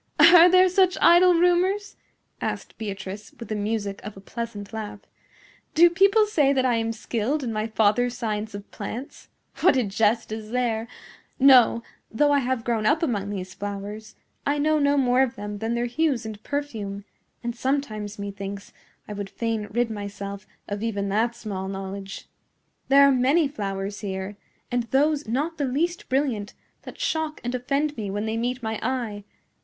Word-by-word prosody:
"Are 335 +3 +9
there 370 +1 +6
such 370 0 +3
idle 350 +1 +6
rumors?" 360 +4 +2 0.5
asked - - -4
Beatrice, 205 0 -6
with 230 - -8
the 215 - -1
music 205 -1 -2
of 210 -1 -8
a - - -8
pleasant 210 0 -7
laugh. 210 -2 -6 0.7
"Do 340 +2 +7
people 395 +4 +5
say 295 -10 +2
that 260 -1 +1
I 245 -2 +2
am 225 0 -1
skilled 235 +6 -2
in 235 -3 -3
my 215 +1 -1
father's 225 +3 +2
science 215 -2 -3
of 200 0 -9
plants? 230 +6 -7 0.3
What - - +4
a 255 - +3
jest 215 +2 +1
is 215 -1 -6
there! 235 -2 -1 0.5
No; 255 -3 +6 0.3
though 290 +6 +2
I 285 - +4
have 255 -2 -1
grown 225 -3 0
up 310 +3 +2
among 205 -9 -1
these 185 -2 -5
flowers, 205 +2 -6 0.3
I 285 +1 0
know 305 +1 +2
no 285 0 +3
more 255 -1 +3
of 265 -2 +1
them 205 0 -6
than 225 +2 -1
their 240 0 0
hues 255 -1 0
and 215 -1 -7
perfume; 215 -9 -4 0.4
and 235 0 -3
sometimes 235 -6 -2
methinks 200 0 -6 0.3
I 210 - -6
would 200 -1 -5
fain 225 -2 -2
rid 240 +1 0
myself 200 -1 -6 0.2
of 205 0 -4
even 200 -3 -2
that 225 +4 +1
small 200 -5 -5
knowledge. 195 0 -6 0.6
There 280 +1 +7
are - - +5
many 275 +5 +3
flowers 200 -5 -4
here, 190 0 -5 0.4
and 245 0 +1
those 285 +4 +1
not 300 +8 -2
the 285 - +1
least 335 +7 -1
brilliant, 255 -7 -1 0.3
that - - -10
shock 315 -10 -1
and 245 +1 -3
offend 280 +4 -1
me 210 -3 -3
when 205 +2 -2
they 220 0 -2
meet 245 +2 -2
my 220 -1 -2
eye. 225 -5 -3
230 Hz, 175 wpm, -25 LUFS, 205-280 Hz, 0.7 s, Are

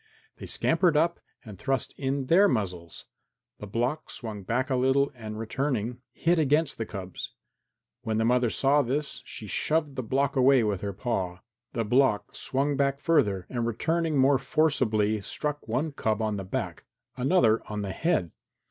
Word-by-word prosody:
They - - -8
scampered 170 -5 +2
up 170 +2 +2 0.3
and 105 -4 -10
thrust 135 -1 -1
in 135 0 -2
their 185 +9 +5
muzzles. 90 - -3 0.5
The 105 - -7
block 120 +9 -2
swung 110 -4 -6
back 125 +7 -1
a - - +3
little 135 +2 +2
and 110 -3 -7
returning, 125 0 -2
hit 170 +1 +1
against 150 -1 +2
the 115 - -2
cubs. 95 -2 -7 0.7
When 110 -3 -2
the 110 - +2
mother 125 0 +3
saw 140 +5 +3
this, 140 +3 -2
she 110 - -8
shoved 150 +6 0
the 130 - -2
block 135 +4 0
away 130 -1 +5
with 105 -4 -1
her 100 - -2
paw. 95 -3 -3 0.3
The 115 -1 -1
block 110 -3 +2
swung 140 +2 0
back 140 0 +1
further, 100 - +2
and 120 -2 -2
returning 160 +7 0
more 135 0 +4
forcibly 115 -9 +1
struck 150 +8 -4
one 130 +8 -1
cub 110 -6 -1
on 110 -1 0
the 100 - -5
back, 95 - -4 0.3
another 125 -5 +3
on 105 -1 -3
the 100 - -3
head. 155 - 0
125 Hz, 165 wpm, -27 LUFS, 110-140 Hz, 0.7 s, their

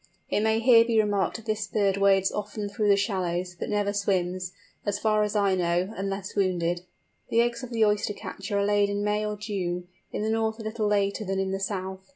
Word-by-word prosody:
It - - +2
may 220 +1 +2
here 230 -1 +7
be 230 -1 0
remarked 205 -2 +1
that 225 - -7
this 215 -1 -1
bird 200 -2 +1
wades 195 -1 +3
often 210 0 -4
through 205 +1 -1
the 200 - +6
shallows, 180 -3 -1
but - - -3
never 205 -1 0
swims, 185 -3 -1 0.3
as 205 0 -1
far 215 0 +2
as 210 0 -1
I 200 -2 +3
know, 180 +2 0
unless 195 0 -4
wounded. 175 -3 +1 0.5
The 230 - +4
eggs 235 0 0
of 255 - -7
the 225 -2 +2
Oyster 210 0 +1
catcher 200 +1 -5
are 200 - +2
laid 205 0 +3
in 200 0 -1
May 210 +1 +1
or 210 0 -3
June, 180 -4 -3 0.2
in - - -3
the 220 - 0
north 220 0 0
a 225 - -8
little 215 0 -1
later 200 0 +1
than 195 -1 -2
in 190 0 -1
the 195 - -2
south. 190 0 -4
205 Hz, 220 wpm, -27 LUFS, 190-215 Hz, 0.5 s, here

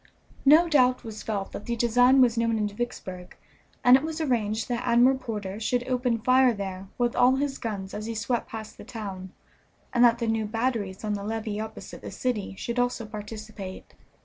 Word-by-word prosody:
No 310 +5 +7
doubt 255 -5 +3
was 220 -2 -7
felt 200 -3 -3
that 205 - -8
the 235 - 0
design 245 +3 +5
was 240 -2 +4
known 230 -1 +1
in 210 -1 0
Vicksburg, 195 -4 -6 0.5
and 250 +1 +8
it 265 - +4
was 320 +1 -4
arranged 225 -7 0
that 240 -1 -2
Admiral 245 +2 +5
Porter 210 -4 -5
should 245 +2 -1
open 250 -2 +1
fire 255 +1 +4
there 195 -1 -5
with 240 -1 0
all 250 +1 +5
his 275 0 -2
guns 200 -4 -5
as 215 +1 -5
he 230 - -4
swept 230 +3 -2
past 220 -1 -8
the - - -8
town, 195 -5 -7 0.6
and 245 -1 +4
that 235 -1 +6
the 235 - -2
new 225 -1 0
batteries 225 -3 -2
on 210 -1 -1
the 200 -1 -3
levee 215 0 -3
opposite 220 0 -7
the - - -7
city 220 -6 -3
should 235 +4 -3
also 245 -2 0
participate. 210 -2 -8
230 Hz, 195 wpm, -26 LUFS, 210-245 Hz, 0.6 s, and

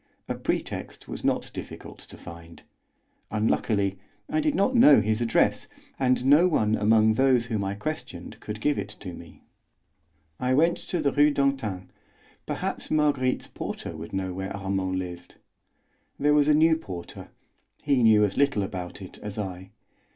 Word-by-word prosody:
A - - -1
pretext - - -4
was - - -7
not - - 0
difficult - - -9
to - - -12
find; 85 0 -12 0.7
unluckily 105 -2 0 0.3
I 310 - 0
did 305 -1 +1
not 200 +7 +2
know 150 - +7
his 110 +2 0
address, 115 -1 +2 0.3
and 130 -1 +2
no 150 +6 +6
one 110 -11 +1
among 110 +1 +4
those 130 0 +3
whom 110 -3 -2
I 100 +1 -2
questioned 105 - -6
could 105 0 -7
give 145 +3 +1
it - - -4
to 90 -3 -7
me. 85 0 -13 1.0
I 125 +1 +1
went 165 +4 +3
to 175 - -3
the 140 - +2
Rue 145 +1 +4
d'Antin; 135 -10 -1 0.6
perhaps - - -4
Marguerite's 145 -4 +1
porter - - -6
would 80 +1 -8
know 95 -1 -3
where 95 +2 -5
Armand 95 -1 -2
lived. 90 -1 -7 0.8
There 150 +1 +3
was 150 -1 +4
a 150 - +5
new 160 +1 +4
porter; 90 - -9 0.5
he 140 -4 +2
knew 110 -2 +6
as 100 - -4
little 140 -7 +2
about 95 0 -6
it 95 - -11
as 105 0 -7
I. 95 -2 -5
110 Hz, 160 wpm, -26 LUFS, 95-140 Hz, 1.0 s, know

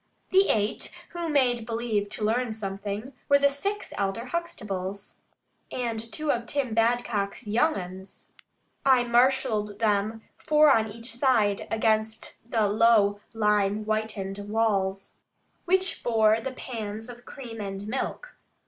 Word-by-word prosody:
The 385 +1 +5
eight, 210 0 0 0.2
who 345 -2 -4
made 250 -5 +2
believe 225 -3 -1
to 215 - -3
learn 235 +1 0
something, 205 +4 -5 0.2
were 280 - +7
the 280 0 +3
six 400 +9 -3
elder 195 +2 -1
Huxtables, 200 - -5 0.5
and 235 -3 -2
two 305 +3 0
of 235 -1 -2
Tim 270 -5 -1
Badcock's 225 -3 0
"young 240 +10 +2
uns." 185 +1 -8 0.5
I 260 -2 +5
marshalled 235 -4 +2
them, 215 0 0 0.2
four 300 -1 +5
on 220 -4 +2
each 230 +2 -8
side, 235 -6 +2
against 220 0 0
the 220 -4 +2
low 205 -1 +4 0.2
lime 210 -1 +2
whitened 215 -2 -2
walls, 195 -3 0 0.5
which 375 +2 +1
bore 220 -1 +3
the 265 +2 -4
pans 220 -3 -6
of 245 0 -10
cream 235 -4 -8
and 195 0 -5
milk. 270 - -4
225 Hz, 130 wpm, -27 LUFS, 205-250 Hz, 0.5 s, were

